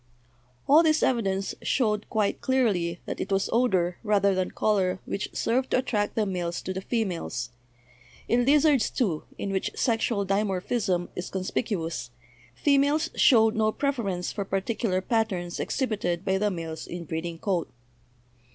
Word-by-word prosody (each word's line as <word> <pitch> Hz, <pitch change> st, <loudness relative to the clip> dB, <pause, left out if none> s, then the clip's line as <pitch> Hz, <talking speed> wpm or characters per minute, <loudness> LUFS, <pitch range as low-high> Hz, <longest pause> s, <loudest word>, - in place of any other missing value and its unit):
All 295 Hz, +4 st, +7 dB
this 315 Hz, -1 st, +3 dB
evidence 195 Hz, -6 st, 0 dB
showed 215 Hz, -5 st, 0 dB
quite 210 Hz, -2 st, 0 dB
clearly 195 Hz, -10 st, +1 dB
that -, -, -4 dB
it 200 Hz, -, -4 dB
was 195 Hz, 0 st, +1 dB
odor 185 Hz, -8 st, +2 dB
rather 200 Hz, -2 st, +3 dB
than 185 Hz, -1 st, 0 dB
color 190 Hz, -3 st, +1 dB
which 195 Hz, -, -3 dB
served 255 Hz, +3 st, 0 dB
to -, -, +2 dB
attract 215 Hz, -5 st, -1 dB
the 220 Hz, -, +1 dB
males 175 Hz, -3 st, -2 dB
to 185 Hz, -, -3 dB
the 190 Hz, -, -4 dB
females. 185 Hz, -, -2 dB, 0.8 s
In 245 Hz, +1 st, +3 dB
lizards, 285 Hz, -2 st, +4 dB
too, 185 Hz, -11 st, -1 dB
in 200 Hz, -, -3 dB
which 190 Hz, -1 st, -1 dB
sexual 225 Hz, -3 st, +1 dB
dimorphism 195 Hz, -1 st, 0 dB
is 180 Hz, -, -5 dB
conspicuous, 185 Hz, -, -3 dB, 0.5 s
females 290 Hz, +3 st, +2 dB
showed 225 Hz, -4 st, +5 dB
no 215 Hz, 0 st, +2 dB
preference 215 Hz, -11 st, -2 dB
for 200 Hz, -, -3 dB
particular 195 Hz, 0 st, -1 dB
patterns 190 Hz, -5 st, -1 dB
exhibited 200 Hz, -9 st, -1 dB
by 190 Hz, 0 st, +1 dB
the 210 Hz, +1 st, +2 dB
males 165 Hz, -4 st, -5 dB
in 175 Hz, -1 st, -6 dB
breeding 165 Hz, +1 st, -4 dB
coat. 180 Hz, -2 st, -1 dB
200 Hz, 145 wpm, -27 LUFS, 180-235 Hz, 0.8 s, All